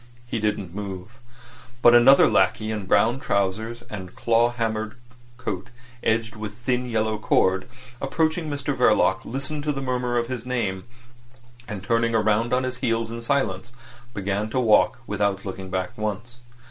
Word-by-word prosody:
He 120 -1 -3
didn't 105 -4 -2
move; 100 +3 -7 0.6
but 120 - +8
another 120 +3 +7
lackey, 110 0 +2
in 105 -3 -4
brown 120 +7 +3
trousers 110 +3 -1
and 95 -3 -8
claw 115 +1 +3
hammer 110 -2 -2 0.4
coat 105 -4 -4 0.3
edged 110 0 0
with 105 -1 -6
thin 125 +1 -1
yellow 110 -1 0
cord, 95 -1 +2 0.3
approaching 160 +3 0
Mr 145 -1 -2
Verloc 105 -6 +3
listened 140 +4 -2
to 150 - +1
the 140 - -3
murmur 125 -2 -1
of 120 - +1
his 125 -1 -5
name, 110 -7 -2 0.8
and 100 -3 -6
turning 115 +1 +1
round 110 +1 +2
on 125 +1 +2
his 130 -1 -2
heel 115 -3 0
in 115 0 -5
silence, 120 -4 -1 0.4
began 100 +2 -2
to 130 - 0
walk, 110 -4 +4
without 100 -2 -1
looking 95 -1 -6
back 95 0 -3
once. 110 +3 -4
115 Hz, 155 wpm, -24 LUFS, 105-125 Hz, 0.8 s, but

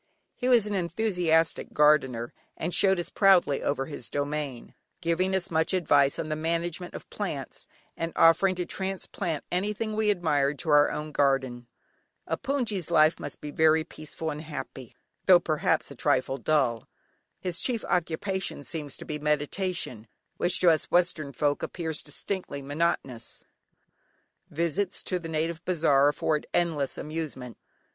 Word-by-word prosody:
He 250 - -3
was 235 -4 +5
an 210 - -3
enthusiastic 175 -4 +1
gardener 135 -6 +3 0.2
and 170 +2 -3
showed 190 +1 +4
us 175 - -3
proudly 185 -8 +4
over 135 -1 -1
his 140 -4 -7
domain, 145 -3 -3 0.3
giving 180 +3 0
us 185 -2 -2
much 160 +3 +1
advice 145 -6 +3
on 155 - -3
the 155 - -1
management 170 +2 -2
of - - -9
plants, - - -4 0.3
and 165 0 -3
offering 185 +3 +5
to 180 0 -2
transplant 190 -4 -3
anything 210 +4 -1
we 215 -1 +1
admired 150 -7 +1
to 165 - -4
our 145 0 +6
own 150 0 -5
garden. 130 -4 0 0.6
A - - -1
hpoongyi's 230 - -1
life 155 -1 +4
must - - -7
be 150 - -6
very 160 +1 +4
peaceful 155 0 -6
and 150 +1 -6
happy, 130 -5 -8 0.3
though 185 -2 +8
perhaps 155 -1 0
a - - -9
trifle 130 +2 +1
dull. 125 -4 +1 0.5
His 180 -2 -1
chief 240 -4 0
occupation 180 0 -1
seems 150 -3 -5
to - - -10
be 150 -1 -4
meditation, 150 - -1 0.3
which 175 +1 +3
to 175 - +7
us 160 - +1
western 170 -5 +1
folk 145 +2 0
appears 160 -4 -2
distinctly 150 -1 -5
monotonous. 145 -5 -2 1.1
Visits 170 +5 -1
to 180 - -1
the 165 -1 -7
native 160 +1 -2
bazaar 150 -6 +3
afford 150 +1 0
endless 160 -6 0
amusement. 150 -6 -5
160 Hz, 150 wpm, -27 LUFS, 145-180 Hz, 1.1 s, though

